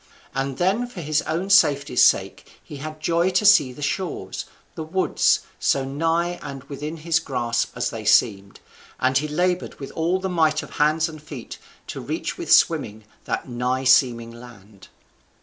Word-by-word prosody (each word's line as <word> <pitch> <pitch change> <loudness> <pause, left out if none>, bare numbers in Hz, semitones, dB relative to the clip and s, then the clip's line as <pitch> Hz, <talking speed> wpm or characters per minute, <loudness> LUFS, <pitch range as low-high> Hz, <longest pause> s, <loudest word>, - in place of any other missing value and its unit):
And 135 0 -3
then 200 +7 +1
for 240 -7 -10
his 155 -2 0
own 180 +5 -2
safety's 140 -7 +4
sake - - +1
he 145 - -10
had 155 +2 -7
joy 170 +3 +1
to 185 +3 +1
see 150 -11 +6
the 145 +3 -9
shores, 180 +4 -3 0.3
the - - -7
woods, 175 +4 +1 0.2
so 135 -1 +1
nigh 165 +5 -1
and 135 -2 -8
within 150 +3 -6
his 165 +1 +1
grasp 120 -5 -2
as 125 - -1
they 115 -2 -6
seemed, 100 -2 +2 0.4
and 130 0 +2
he 150 - -3
laboured 180 +4 -1
with 135 - -7
all 170 +3 0
the 190 - -3
might 160 -4 +1
of - - -11
hands 155 +2 +2
and 155 -2 -10
feet 145 -6 -9 0.3
to - - -7
reach - - -4
with - - -5
swimming 105 +1 +3 0.2
that - - -3
nigh 125 +1 -2
seeming 125 -3 +3
land. 110 -5 -15
150 Hz, 170 wpm, -23 LUFS, 130-170 Hz, 0.4 s, see